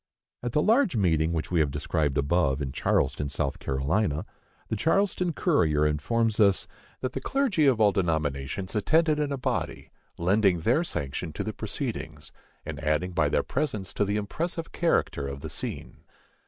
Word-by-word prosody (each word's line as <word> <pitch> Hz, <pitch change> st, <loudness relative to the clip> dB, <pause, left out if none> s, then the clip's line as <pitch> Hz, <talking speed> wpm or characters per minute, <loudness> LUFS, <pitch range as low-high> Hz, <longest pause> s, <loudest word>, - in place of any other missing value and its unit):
At 120 Hz, -1 st, -3 dB
the 150 Hz, -, +3 dB
large 225 Hz, -, +3 dB
meeting 80 Hz, -6 st, +2 dB
which 80 Hz, -2 st, -3 dB
we 85 Hz, -, +2 dB
have 75 Hz, -2 st, +3 dB
described 75 Hz, +1 st, -1 dB
above, 70 Hz, -1 st, +2 dB
in 70 Hz, -3 st, -3 dB
Charleston, 70 Hz, +2 st, 0 dB
South 70 Hz, -, -2 dB
Carolina, 75 Hz, +5 st, 0 dB, 0.4 s
the -, -, -2 dB
Charleston 180 Hz, -, +1 dB
Courier 80 Hz, -, +2 dB
informs 110 Hz, +10 st, 0 dB
us 100 Hz, -3 st, +4 dB, 0.3 s
"that 130 Hz, -, -2 dB
the 135 Hz, -, -3 dB
clergy 225 Hz, -, +2 dB
of 130 Hz, -5 st, +3 dB
all 105 Hz, -2 st, +5 dB
denominations 80 Hz, -1 st, -1 dB
attended 155 Hz, +7 st, +3 dB
in 145 Hz, -1 st, 0 dB
a 140 Hz, -, -1 dB
body, 130 Hz, -, -3 dB, 0.3 s
lending 95 Hz, 0 st, +2 dB
their 120 Hz, -, +2 dB
sanction 75 Hz, -, -4 dB
to -, -, -3 dB
the -, -, -4 dB
proceedings, -, -, -5 dB, 0.3 s
and -, -, -5 dB
adding 75 Hz, +4 st, +1 dB
by 80 Hz, -4 st, +2 dB
their -, -, +1 dB
presence 110 Hz, -11 st, -2 dB
to -, -, +1 dB
the 100 Hz, +1 st, 0 dB
impressive 165 Hz, -, -3 dB
character 120 Hz, -, 0 dB
of 70 Hz, 0 st, -6 dB
the -, -, -6 dB
scene." -, -, -5 dB
95 Hz, 170 wpm, -27 LUFS, -, 0.4 s, all